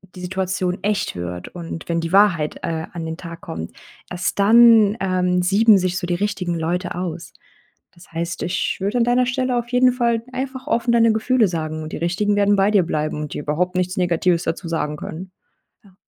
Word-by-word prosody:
die 180 - -9
Situation 185 0 -2
echt 210 -1 -1
wird 90 0 -6
und 165 -2 -8
wenn 170 -1 -1
die 165 +1 -4
Wahrheit, 190 -7 +3
äh, 160 -1 -3
an 165 -2 -5
den 160 +1 -5
Tag 170 -1 -9
kommt 80 +1 -6 0.4
erst 180 +2 -3
dann, 225 0 +6
ähm, 180 -1 +1
sieben 205 +3 +5
sich 180 -1 -1
so 175 - -3
die 175 - 0
richtigen 180 -2 -2
Leute 175 +4 -2
aus. 175 -2 -5 0.6
Das 170 -1 -18
heißt, 170 +1 -4
ich 175 +2 -1
würde 200 +6 -1
an - - +4
deiner 245 +1 +3
Stelle 255 0 -1
auf 240 0 -3
jeden 250 0 +4
Fall 235 -2 0
einfach 260 0 -5
offen 235 +1 +1
deine 230 -1 +4
Gefühle 220 0 +2
sagen. 155 -2 -4
Und 155 - -8
die - - -3
Richtigen 185 +5 0
werden 205 0 +3
bei 195 +2 +3
dir 200 -4 +4
bleiben 155 -2 -2
und 150 - -6
dir 145 - -5
überhaupt 180 +5 -1
nichts 185 0 -1
Negatives 175 -1 +1
dazu 170 +1 -3
sagen 150 -2 -2
können. 180 +5 -8 0.5
Ja. 195 -2 -21
180 Hz, 200 wpm, -21 LUFS, 170-210 Hz, 0.6 s, dann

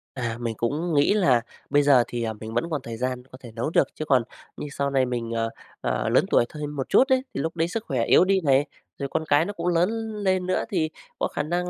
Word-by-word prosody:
À, 115 -3 -3
mình 115 -2 -3
cũng 155 +8 -1
nghĩ 145 +5 +4
là 140 - +3 0.3
bây 145 0 +4
giờ 135 -4 +6
thì, 120 -1 -3
à, 110 -1 -2
mình 110 +1 -8
vẫn 165 +9 -1
còn 150 -4 -2
thời 115 -3 -7
gian 125 +1 -2
có 130 - -10
thể 120 - -10
nấu 115 +6 -2
được. - - +3
Chứ 155 - -4
còn 130 -5 +3 0.3
như - - -5
sau 140 0 -1
này 135 -2 +2
mình, 120 -2 -3
à, 115 0 0 0.3
à, - - -1
lớn - - +4
tuổi - - +4
thêm 150 -1 -5
một 135 -2 -3
chút - - +6
đấy, 260 0 +3
thì - - -2
lúc 160 +3 -3
đấy 165 0 +1
sức 215 +5 -4
khỏe 130 -6 0
yếu - - +6
đi 190 0 +2
này, 140 -2 +3 0.3
rồi 140 -1 -4
con 160 - -1
cái 145 +3 +4
nó 205 - -4
cũng 170 -3 -4
lớn 175 +1 +3 0.3
lên 185 -1 +1
nữa 185 - 0
thì 170 -7 0 0.3
có - - +1
khả - - -3
năng 175 +3 -1
145 Hz, 265 wpm, -25 LUFS, 125-170 Hz, 0.3 s, giờ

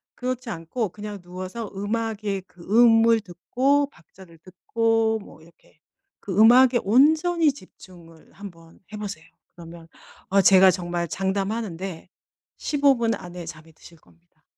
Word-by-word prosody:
그렇지 250 -1 -4
않고 185 +5 -4
그냥 205 0 -9
누워서 185 +5 -8
음악의 205 -1 -3
그 175 - -20
음을 225 0 +5
듣고 265 +10 0
박자를 170 - -19
듣고 225 +5 -1
뭐 200 - -15
이렇게 165 -1 -24 0.4
그 195 -1 -6
음악에 245 +3 +6
온전히 310 - +3
집중을 175 - -17
한번 165 -5 -13
해 215 - -7
보세요. 200 -6 -7 0.3
그러면 170 -1 -12 0.4
어 195 +1 +4
제가 190 0 +6
정말 175 -1 -4
장담하는데 195 -2 -4 0.5
15 280 -3 +2
분 230 -1 0
안에 175 -2 -9
잠이 160 -1 -11
드실 170 +1 -17
겁니다. 85 - -30
195 Hz, 270 characters per minute, -23 LUFS, 175-230 Hz, 0.5 s, 음악에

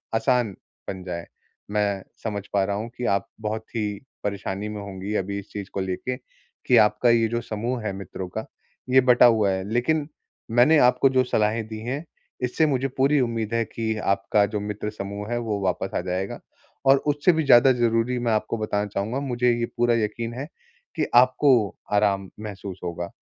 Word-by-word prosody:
आसान 120 -1 +2 0.4
बन 95 -1 -5
जाए। 85 -2 -5 0.4
मैं 100 -2 0 0.2
समझ 105 -3 -3
पा 100 -1 +3
रहा 100 0 -1
हूँ 110 +3 -4
कि 125 - -3
आप 100 -2 +1
बहुत 110 +1 -3
ही 110 -2 0 0.4
परेशानी 100 0 -3
में 105 -1 -5
होंगी 100 +1 -5
अभी 100 0 -2
इस 100 - -13
चीज़ 100 -1 -6
को - - -2
लेके 95 +7 -3 0.5
कि 125 - +6
आपका 105 +2 +4
ये 115 -1 +4
जो 120 +1 -1
समूह 115 +2 -3
है 105 - -1
मित्रों 95 -1 -6
का, 110 +4 -5 0.4
ये 130 +1 +6
बटा 125 -1 +6
हुआ 110 -4 +4
है, 95 0 -2
लेकिन 145 +5 +1 0.4
मैंने 125 +7 +5
आपको 125 +1 +5
जो 130 -1 +3
सलाहें 110 -1 +1
दी 110 -1 -7
हैं, 130 +7 -3 0.4
इससे 125 +5 +2
मुझे 135 -2 +1
पूरी 140 +2 +4
उम्मीद 115 -2 -2
है 115 0 +2
कि 110 0 -3
आपका 100 0 +2
जो 105 +1 -3
मित्र 105 +1 -4
समूह 100 0 -6
है 120 - 0
वो 110 -3 -2
वापस 90 -2 -1
आ - - 0
जाएगा। 95 +2 -3 0.5
और 135 +1 +7
उससे 145 +5 +2
भी 160 0 +1
ज़्यादा 130 0 +7
ज़रूरी 120 +1 +1
मैं 120 -1 0
आपको 110 +1 -1
बताना 105 -1 -1
चाहूँगा, 105 +6 -2
मुझे 125 -3 +1
ये 120 - +1
पूरा 120 0 +3
यकीन 115 +2 -3
है, 135 +5 -5 0.5
कि 155 -3 +1
आपको 125 -3 +4 0.2
आराम 100 -2 +2
महसूस 100 -3 -7
होगा। 85 0 -4
110 Hz, 190 wpm, -24 LUFS, 100-125 Hz, 0.5 s, और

